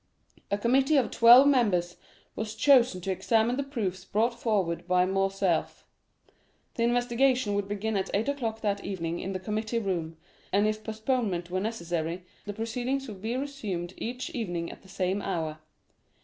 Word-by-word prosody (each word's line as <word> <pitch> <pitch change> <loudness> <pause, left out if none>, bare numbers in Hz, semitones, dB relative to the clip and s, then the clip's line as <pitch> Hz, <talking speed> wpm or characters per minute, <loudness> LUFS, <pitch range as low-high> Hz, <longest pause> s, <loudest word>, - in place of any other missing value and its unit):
A 200 - +1
committee 265 +7 +3
of 260 - +2
twelve 240 +3 +8
members 205 -11 +2 0.4
was 215 0 -4
chosen 245 -6 +4
to 190 - -2
examine 225 +5 +2
the 280 - -1
proofs 215 -10 -3
brought 225 +5 +1
forward 190 -8 -1
by 180 0 +3
Morcerf. 195 -2 0 0.9
The - - -4
investigation 245 -1 +2
would 200 -1 -1
begin 205 +2 -2
at 195 -1 -1
eight 210 +5 0
o'clock 230 -6 -2
that 200 -2 -1
evening 170 -3 -3
in 195 - -4
the 185 - -3
committee 215 +4 -2
room, 175 -7 -2 0.3
and 200 +2 +3
if 215 0 -1
postponement 220 -6 -2
were 185 - 0
necessary, 175 -4 -3 0.2
the 205 - -4
proceedings 245 +5 -2
would 200 -4 -9
be 230 +4 -2
resumed 210 -11 -4
each 250 +2 -5
evening 175 -8 -3
at - - -13
the 190 - -18
same 190 +1 -1
hour. 160 -5 -3
210 Hz, 165 wpm, -28 LUFS, 185-235 Hz, 0.9 s, twelve